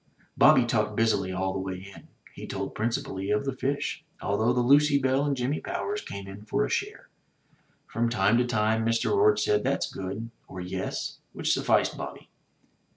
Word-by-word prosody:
Bobby 120 - +6
talked 105 -2 0
busily 110 -4 +1
all 95 0 -1
the 95 - -2
way 95 +1 -6
in. - - -14 0.3
He - - -8
told - - -4
principally 105 -4 -2
of 105 +5 +1
the 135 - -1
fish, 140 +2 -2 0.2
although 110 +4 +1
the 125 0 +2
Lucy 140 +3 +5
Belle 135 0 +2
and 140 -2 0
Jimmy 130 +4 -1
Powers 410 +4 -3
came 100 -1 -7
in 95 +1 -9
for 105 - 0
a - - -5
share. - - -3 0.8
From 115 +1 -1
time 110 0 +3
to 125 - +2
time 110 -1 +1
Mr. 115 - +1
Orde 420 +1 +5
said, 425 0 +2
"That's - - -1
good," 100 +5 -5 0.2
or, 90 - -8
"Yes," 95 +1 -4
which - - 0
sufficed - - +2
Bobby. - - -8
115 Hz, 180 wpm, -27 LUFS, 95-135 Hz, 0.8 s, Bobby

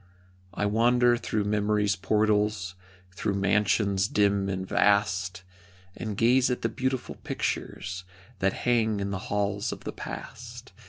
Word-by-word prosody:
I 100 - 0
wander 120 +3 +4
through 110 -3 -1
memory's 105 0 +1
portals, 105 0 +1 0.4
Through 100 +2 -2
mansions 100 0 +2
dim 100 -2 +2
and 95 -1 -3
vast, 100 -3 +2 0.5
And 105 -3 -5
gaze 125 +3 +4
at 125 - -2
the 115 - +1
beautiful 130 +2 -3
pictures 90 -1 -3 0.4
That 95 0 +2
hang 110 -4 +2
in 100 0 -2
the 100 - -2
halls 100 0 -1
of - - -8
the - - -5
past. - - -8
105 Hz, 130 wpm, -27 LUFS, 100-110 Hz, 0.5 s, wander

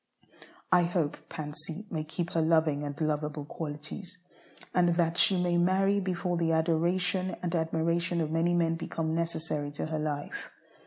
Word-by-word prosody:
I 180 -1 +6
hope 170 -4 -2
Pansy 155 +5 -5
may 155 -2 -1
keep 170 +3 -4
her 165 - +1
loving 160 -2 +3
and 145 +1 -5
lovable 150 -1 -1
qualities, 155 +6 -7 0.6
and 175 -1 +3
that 170 -1 +2
she 185 +1 +5
may 175 -1 +2
marry 195 +3 +3
before 180 -2 -1
the 165 -1 +2
adoration 175 +3 +1
and 175 -1 -1
admiration 170 +1 0
of 155 -2 -1
many 170 +2 +2
men 165 -1 +2
become 160 -1 -2
necessary 160 -3 -2
to - - -3
her 155 0 -2
life. 150 -1 -4
165 Hz, 155 wpm, -30 LUFS, 155-175 Hz, 0.6 s, I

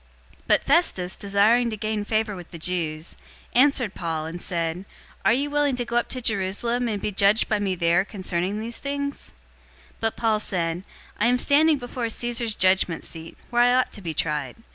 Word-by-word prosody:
025:009 - - -31 0.4
But - - +3
Festus, 190 - +3
desiring 210 +4 +3
to 215 - -5
gain 215 0 -2
favor 215 0 -1
with 175 -2 -10
the 170 - -9
Jews, 165 -2 -2 0.4
answered 255 -5 +3
Paul 160 -2 -3
and 170 +2 -6
said, 170 0 -3 0.4
"Are - - +4
you 280 +5 +1
willing 290 -2 +2
to 245 -1 -3
go 235 0 -1
up 240 - +1
to 255 - -2
Jerusalem, 225 +4 0
and 210 -2 -2
be 210 - -2
judged 200 +3 +4
by 210 - +1
me 195 -2 -1
there 170 +1 +3
concerning 190 -1 -2
these 230 +2 -5
things?" 280 0 -4 0.6
025:010 - - -28
But 225 0 -1
Paul 220 -2 +1
said, 175 -3 -2 0.4
"I 220 - +3
am 250 +1 +3
standing 300 +4 +4
before 245 -2 -4
Caesar's 235 -1 -1
judgment 185 -2 +2
seat, 165 0 -7
where 240 0 +3
I 245 +1 +5
ought 255 - +2
to 205 - -8
be 165 -4 -5
tried. 150 -5 -2
210 Hz, 195 wpm, -24 LUFS, 180-240 Hz, 0.6 s, I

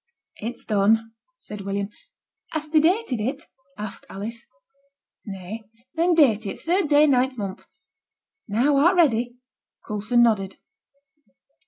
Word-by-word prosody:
'It's 235 +3 -5
done,' 220 +2 +2 0.3
said 210 -1 -8
William. 200 0 -2 0.7
'Hast 310 -1 -4
thee 310 - +6
dated 325 - +1
it?' 270 +7 -2 0.3
asked 210 -1 -7
Alice. 225 +4 -7 0.8
'Nay.' 195 +3 -6 0.3
'Then 340 +1 +2
date 230 -9 +4
it - - -5
third 355 +1 +1
day, 295 0 +6
ninth 260 -2 +2
month. 195 -2 -6 0.8
Now, 250 +7 +2
art 340 +7 +5
ready?' 245 -7 +2 0.5
Coulson 215 +3 +2
nodded. 195 -5 +1
235 Hz, 120 wpm, -24 LUFS, 210-295 Hz, 0.8 s, thee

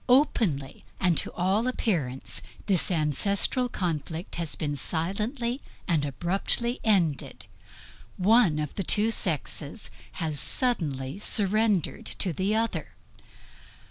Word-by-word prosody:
Openly 210 - +2 0.2
and 180 -3 +3
to - - -1
all 195 +6 +1
appearance, 160 - -2 0.2
this 190 -5 +2
ancestral 200 - +1
conflict 165 -3 -3
has 170 -3 -2 0.2
silently 210 - -2 0.3
and 165 -6 +2
abruptly 195 - -1
ended; 180 -10 +1 0.7
one 200 -4 +4
of 150 -2 -3
the 195 - -2
two 210 +5 +5
sexes 160 -1 -1 0.2
has 155 -4 -2
suddenly 150 - 0
surrendered 210 -3 +1
to 180 - +2
the 195 +6 0
other. 225 +1 -2
185 Hz, 105 wpm, -27 LUFS, 155-220 Hz, 0.7 s, two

